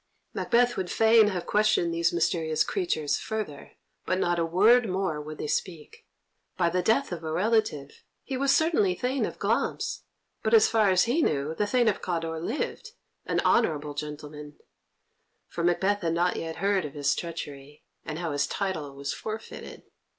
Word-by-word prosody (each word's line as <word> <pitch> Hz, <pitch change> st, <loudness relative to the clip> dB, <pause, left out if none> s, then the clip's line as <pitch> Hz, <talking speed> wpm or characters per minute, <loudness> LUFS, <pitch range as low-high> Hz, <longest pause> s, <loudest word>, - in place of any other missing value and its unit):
Macbeth 245 Hz, +1 st, +2 dB
would 185 Hz, -2 st, -2 dB
fain 225 Hz, -1 st, +5 dB
have 185 Hz, -4 st, -2 dB
questioned 210 Hz, -5 st, +2 dB
these 165 Hz, 0 st, +1 dB
mysterious 165 Hz, -2 st, +1 dB
creatures 250 Hz, -, -1 dB
further, 215 Hz, -10 st, -5 dB, 0.3 s
but 185 Hz, -, +1 dB
not 175 Hz, -2 st, +1 dB
a -, -, +2 dB
word 215 Hz, +7 st, +4 dB
more 185 Hz, -5 st, -1 dB
would 155 Hz, +1 st, -8 dB
they -, -, -4 dB
speak. 160 Hz, 0 st, -4 dB, 0.5 s
By 170 Hz, -2 st, +2 dB
the 180 Hz, +1 st, +1 dB
death 225 Hz, +7 st, +1 dB
of 170 Hz, -2 st, -5 dB
a 160 Hz, -, -3 dB
relative, 185 Hz, -6 st, 0 dB, 0.2 s
he 270 Hz, -, -4 dB
was 275 Hz, +1 st, +2 dB
certainly 305 Hz, -, +3 dB
Thane 255 Hz, +6 st, -1 dB
of -, -, -8 dB
Glamis, -, -, -1 dB, 0.4 s
but, 220 Hz, +1 st, +3 dB
as 215 Hz, -, +6 dB
far 220 Hz, -3 st, +3 dB
as 185 Hz, 0 st, +4 dB
he 255 Hz, +8 st, +1 dB
knew, 150 Hz, -, 0 dB
the 205 Hz, +5 st, -1 dB
Thane 245 Hz, +1 st, +2 dB
of 210 Hz, -, +1 dB
Cawdor 165 Hz, -2 st, -3 dB
lived, 300 Hz, -, -4 dB, 0.3 s
an -, -, +1 dB
honourable 150 Hz, -9 st, +1 dB
gentleman, 150 Hz, 0 st, -7 dB, 0.9 s
for 170 Hz, -, -4 dB
Macbeth 190 Hz, +4 st, +1 dB
had 165 Hz, -2 st, 0 dB
not 175 Hz, +1 st, +1 dB
yet 165 Hz, 0 st, -4 dB
heard 195 Hz, 0 st, +1 dB
of 150 Hz, -1 st, -7 dB
his 140 Hz, -2 st, +1 dB
treachery, 150 Hz, -4 st, -7 dB, 0.2 s
and 155 Hz, -, -5 dB
how 170 Hz, -2 st, -3 dB
his 145 Hz, 0 st, 0 dB
title 160 Hz, -8 st, -3 dB
was 140 Hz, 0 st, -4 dB
forfeited. 220 Hz, +1 st, -7 dB
175 Hz, 170 wpm, -27 LUFS, 155-220 Hz, 0.9 s, as